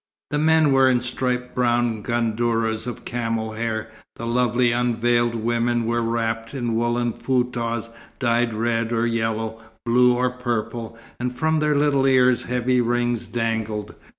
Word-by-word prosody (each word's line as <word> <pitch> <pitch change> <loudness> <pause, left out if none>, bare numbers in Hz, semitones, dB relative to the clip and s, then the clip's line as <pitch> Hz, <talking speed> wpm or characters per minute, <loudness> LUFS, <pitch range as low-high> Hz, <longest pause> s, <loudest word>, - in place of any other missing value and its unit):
The 150 - 0
men 160 -1 +4
were 135 -1 +5
in 125 -1 +3
striped 125 0 -2
brown 120 -2 +1
gandourahs 115 0 0
of 125 - -6
camel's 115 -2 -2
hair; 110 -1 -3 0.2
the 115 - -6
lovely 120 0 +2
unveiled 120 0 +1
women 120 +1 0
were 120 +1 0
wrapped 115 +1 -2
in 120 -3 -2
woollen 120 +1 0
foutahs 120 -3 -1 0.3
dyed 120 -1 +1
red 115 0 0
or 115 0 +1
yellow, 115 -1 -2 0.2
blue 125 +1 +4
or 125 0 +1
purple, 120 -2 -4 0.2
and 125 +1 -1
from 160 0 +1
their 150 -1 +2
little 140 -2 +3
ears 130 -2 +4
heavy 125 0 +1
rings 120 -1 0
dangled. 110 -3 -2
120 Hz, 145 wpm, -23 LUFS, 115-125 Hz, 0.3 s, were